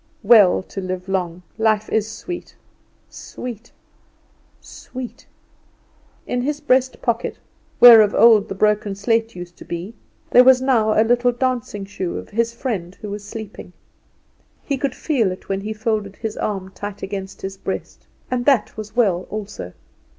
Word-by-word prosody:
Well 205 -6 +6
to 195 - -7
live 185 0 -5
long; 180 -2 -2 0.2
life 215 -1 +2
is 220 0 0
sweet, 355 +9 -7 0.5
sweet, 240 -1 -9 0.9
sweet! 255 -2 -10 1.0
In 245 - -2
his 290 +3 -2
breast 260 -3 +1
pocket, 235 -1 -1 0.4
where 235 -2 +10
of 210 -1 +2
old 220 -1 +6
the - - -4
broken 210 0 +1
slate 225 +2 0
used 175 -1 -9
to - - -11
be, 175 +5 -6 0.4
there 250 - +8
was 260 0 +6
now 230 -5 +2
a 220 - +5
little 245 +1 +3
dancing 240 -5 -2
shoe 190 -3 -4
of - - -8
his 230 +2 0
friend 210 -8 -4
who 210 -2 -7
was 205 0 -6
sleeping. 210 -4 -9 0.9
He 280 - -1
could 270 -1 -2
feel 240 -11 0
it 185 - -10
when 195 0 -1
he 210 +2 -5
folded 215 -2 -2
his 220 -1 -5
arm 190 -3 -3
tight 205 +1 -7
against 195 -1 -6
his 195 0 -4
breast; 190 0 -6 0.2
and 245 -1 -1
that 265 -7 +3
was 215 0 -8
well 195 -7 +1
also. 205 - -6
215 Hz, 160 wpm, -21 LUFS, 195-240 Hz, 1.0 s, where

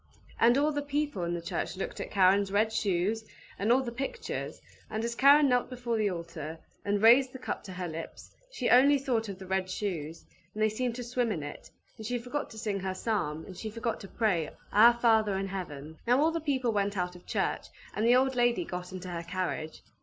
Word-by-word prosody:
And 240 +3 +5
all 295 +2 +3
the 290 0 -1
people 290 -8 -2
in 170 0 -1
the 170 - -5
church 170 0 -3
looked 195 - -4
at - - -4
Karen's 195 0 +4
red 215 +2 +2
shoes, 205 +2 0 0.4
and 210 +4 +2
all 260 +2 +4
the 240 - -4
pictures, 270 - -4 0.3
and 220 +1 -2
as 235 - -2
Karen 280 +4 +6
knelt 250 -2 +2
before 245 -2 -3
the 215 -2 +1
altar, 170 -3 -6 0.3
and 205 +1 0
raised 250 +3 +6
the - - -6
cup 255 - -5
to 190 - -7
her 180 0 -4
lips, 165 0 -8 0.2
she 255 - -2
only 280 +3 +7
thought 240 -5 -1
of 195 - -6
the 190 - -10
red 190 0 -1
shoes, 170 -6 -4 0.3
and 215 - 0
they 215 - +4
seemed 235 +2 -2
to 245 - -5
swim 245 -1 -1
in 160 -7 -3
it; 145 - -8 0.3
and 220 - -6
she 245 +1 -1
forgot 250 +5 -4
to 220 - -12
sing 210 -2 -2
her 190 0 -3
psalm, 175 -8 -2
and 185 - -10
she 220 - -5
forgot 230 +1 -3
to 195 - -9
pray, 190 -9 0 0.2
"Our 235 +3 +7
Father 220 -4 +3
in 195 0 -3
Heaven!" 160 -5 -7
Now 245 +2 +4
all 315 +3 +4
the 330 - -2
people 260 -5 0
went 205 -1 0
out 180 0 -2
of 175 - -15
church, - - -1 0.3
and - - -1
the 240 +2 +5
old 265 +1 +3
lady 240 +6 +2
got 180 - -6
into 185 -1 -7
her 170 -1 -4
carriage. 170 -2 -4
215 Hz, 230 wpm, -29 LUFS, 185-245 Hz, 0.4 s, only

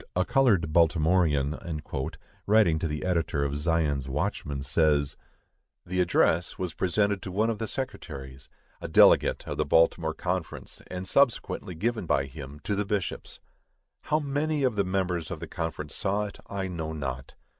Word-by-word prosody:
"A 90 +1 +2
Colored 105 - +3
Baltimorean," 80 -3 +3 0.9
writing 100 -7 +4
to 80 - -1
the 75 +1 -4
editor 85 -5 0
of 70 0 -1
Zion's 75 -3 0
Watchman, 75 -3 -2
says: 70 0 +2 0.7
The 90 +1 -2
address 85 -1 +2
was 90 -3 -3
presented 100 +3 +1
to 95 - -6
one 110 +5 +1
of 110 - -5
the 110 - -2
secretaries, 70 - -6 0.3
a - - -4
delegate - - +5
of - - -4
the - - +4
Baltimore 80 +1 +3
Conference, 90 0 -4
and 90 +1 -5
subsequently 105 -5 +1
given 110 +1 -1
by 70 - +2
him 70 +1 -9
to 105 - -1
the 100 +1 0
bishops. 100 -2 -3 0.7
How 155 - +2
many 145 0 -1
of 125 -4 +2
the 100 - +2
members 90 -3 -1
of - - -5
the - - -5
conference 75 -3 -4
saw 100 +1 0
it, 100 - -9
I 100 -1 -3
know 80 -3 -4
not. 65 -4 -5
85 Hz, 160 wpm, -27 LUFS, 75-100 Hz, 0.9 s, delegate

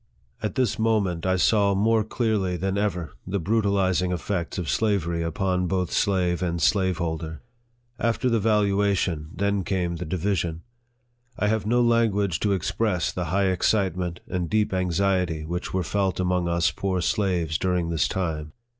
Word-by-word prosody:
At 110 -4 -3
this 125 -5 0
moment, 100 -6 +1
I 95 - +3
saw 100 +1 +3
more 110 +2 +3
clearly 105 -5 -1
than 95 +2 -1
ever 90 -7 -1 0.2
the 95 +2 -1
brutalizing 95 -2 +1
effects 90 -1 -3
of 90 -4 -3
slavery 90 -6 0
upon 90 +2 0
both 90 -1 -1
slave 90 -4 +1
and 85 -2 -1
slaveholder. 85 -5 0 0.6
After 115 +2 0
the 115 -2 +2
valuation, 100 -6 +1
then 100 +1 0
came 90 -2 -1
the 90 - -5
division. 85 -1 -1 0.7
I 105 - +1
have 110 -1 0
no 120 +2 +3
language 105 -6 +2
to 105 - +1
express 95 0 0
the 90 - -3
high 95 +4 +1
excitement 90 -2 0
and 90 -2 -2
deep 105 -2 +1
anxiety 90 -3 0
which 90 +3 -4
were 95 -1 0
felt 95 +2 -1
among 90 -1 +1
us 85 -4 +2
poor 95 +4 -2
slaves 90 -5 0
during 90 -2 0
this 80 -2 +1
time. 80 -6 -3
95 Hz, 155 wpm, -25 LUFS, 85-100 Hz, 0.7 s, I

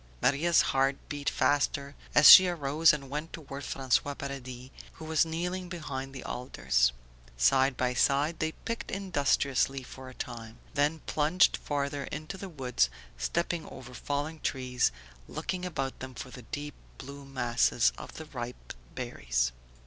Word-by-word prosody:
Maria's 160 - +3
heart 135 +1 +2
beat 145 -1 -1
faster 140 -1 +1 0.2
as 150 - +8
she 185 - +12
arose 160 -1 +3
and 140 -3 -4
went 150 +4 -5
toward 140 -3 -8
François 140 +1 0
Paradis 130 -2 -7 0.2
who 160 - -10
was 160 0 +2
kneeling 180 +3 -3
behind 140 -6 -5
the 135 -2 -8
alders. 65 - +1 0.5
Side 130 - +3
by 125 0 0
side 145 +6 +2
they 160 0 -1
picked 230 0 -5
industriously 140 -7 +1
for 130 0 -10
a 130 - -13
time, 115 -1 -7 0.2
then 150 +3 +1
plunged 155 +5 +3
farther 140 -1 -2
into 155 +5 -6
the 190 0 -7
woods, 125 - 0 0.3
stepping 170 - -1
over 125 -1 -11
fallen 145 +5 -3
trees, 125 - 0 0.4
looking 185 -1 -4
about 135 -7 -3
them 130 -1 -8
for 125 - -7
the 125 - -10
deep 145 0 -5 0.2
blue 140 +1 -9
masses 120 -3 +2
of - - -10
the 160 - -7
ripe 125 -4 -7 0.2
berries. - - -1
140 Hz, 150 wpm, -29 LUFS, 130-155 Hz, 0.5 s, she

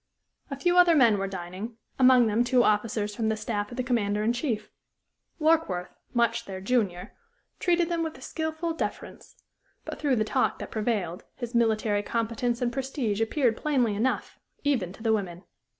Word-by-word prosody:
A 275 - -5
few 350 +6 +3
other 350 -2 +6
men 230 -8 +5
were 195 - -1
dining; 190 +5 -6 0.2
among 255 -1 +6
them 220 +2 +2
two 245 0 +3
officers 210 -1 +1
from 220 -1 0
the 220 - 0
staff 205 -1 -3
of 240 - -9
the 255 - 0
Commander 210 -4 0
in 230 +2 +2
Chief. 235 -5 -3 0.7
Warkworth, 310 - +1 0.2
much 235 -1 +1
their 190 -1 -6
junior, 195 -4 -1 0.5
treated 345 -1 +2
them 340 -1 -1
with 320 -1 -3
a - - -15
skilful 315 +1 -3
deference; - - -6 0.5
but - - -6
through 285 -4 +2
the 215 - +2
talk 255 +4 0
that - - -8
prevailed 210 -6 -2
his 240 -1 -6
military 220 -3 +2
competence 235 +2 -1
and 240 -1 0
prestige 260 -5 -2
appeared 230 0 +2
plainly 255 -7 +1
enough, 230 +6 -1 0.2
even 255 -12 +1
to 220 - -12
the 225 -1 +3
women. 185 -4 -3
235 Hz, 175 wpm, -27 LUFS, 210-260 Hz, 0.7 s, other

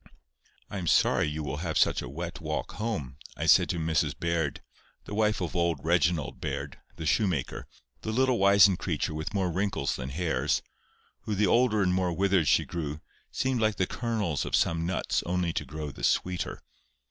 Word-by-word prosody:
"I 100 - -5
am 85 - -4
sorry - - +3
you 75 +1 -3
will 75 -1 -3
have 80 0 -2
such - - +3
a - - -6
wet - - -6
walk - - -3
home," 80 - -4 0.2
I - - -2
said - - +5
to - - -1
Mrs 80 -1 0
Baird, 85 -4 -1 0.4
the - - -7
wife 105 -1 +1
of 90 0 -3
old 85 -2 +1
Reginald 85 -2 +1
Baird, 70 +1 -4 0.2
the 80 - -6
shoemaker, 85 - 0 0.3
a - - -10
little 130 +2 +2
wizened 100 -1 +6
creature, 80 -1 -2
with 80 +6 -4
more 95 -3 +1
wrinkles 95 +4 -1
than 65 0 -5
hairs, 80 +4 0 0.6
who 105 - -1
the 105 +2 +3
older 115 -3 +3
and 90 -1 +2
more 90 -1 +1
withered 95 -3 +2
she - - +4
grew, 75 -3 -4 0.3
seemed 130 -3 0
like 110 -1 +2
the 95 - +1
kernels 105 - -2
of - - 0
some 80 0 +1
nuts 95 - 0
only 90 -1 0
to 75 - -2
grow 75 +2 -6
the - - -11
sweeter. 90 -1 0
90 Hz, 185 wpm, -28 LUFS, 80-100 Hz, 0.6 s, wizened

